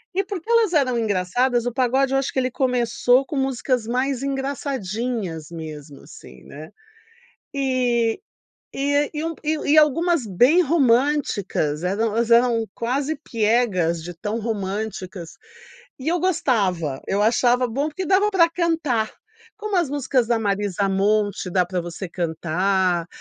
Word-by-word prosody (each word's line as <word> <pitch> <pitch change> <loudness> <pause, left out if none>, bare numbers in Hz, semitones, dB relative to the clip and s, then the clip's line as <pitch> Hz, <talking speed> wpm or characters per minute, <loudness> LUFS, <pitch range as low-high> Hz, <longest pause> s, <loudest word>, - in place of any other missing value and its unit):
E 390 - +2
porque 390 -1 -7
elas 460 -5 +3
eram 265 -6 +2
engraçadas, 230 +4 0
o 245 - -1
pagode 260 +2 +1
eu - - +3
acho 270 0 -2
que 260 - 0
ele 255 - 0
começou 250 0 +2
com 295 - -6
músicas 260 -2 -1
mais 255 +2 -1
engraçadinhas 240 - -3
mesmo, 155 -4 -9
assim, 65 0 -14
né. 155 +2 -11 0.8
E 250 -4 0 0.5
e 285 +1 0
a 290 0 +2
e 300 0 -3
um 330 0 -2
e 310 +1 +1 0.2
e - - +5
algumas 310 -2 +3
bem 245 - +4
românticas, 255 - +1
eram 200 +5 0
elas 230 +2 0
eram 235 -1 +4
quase 270 +6 -2
piegas 215 - 0
de 175 +2 -7
tão 210 +7 -4
românticas 200 -4 -5 0.6
e 260 - -9
eu 350 +1 +1
gostava, 200 - 0
eu 200 +1 +1
achava 245 +3 +3
bom 275 +6 -2
porque 345 +5 -5
dava 395 +3 +3
pra 350 -4 +4
cantar, 325 -10 0 0.5
como 425 -2 -3
as 345 -5 +2
músicas 265 -3 0
da 235 0 +1
Marisa 200 -2 -1
Monte 205 0 0
dá 180 0 +2
pra 180 +1 -3
você 175 +3 -6
cantar, 175 +1 0
240 Hz, 145 wpm, -22 LUFS, 195-280 Hz, 0.8 s, e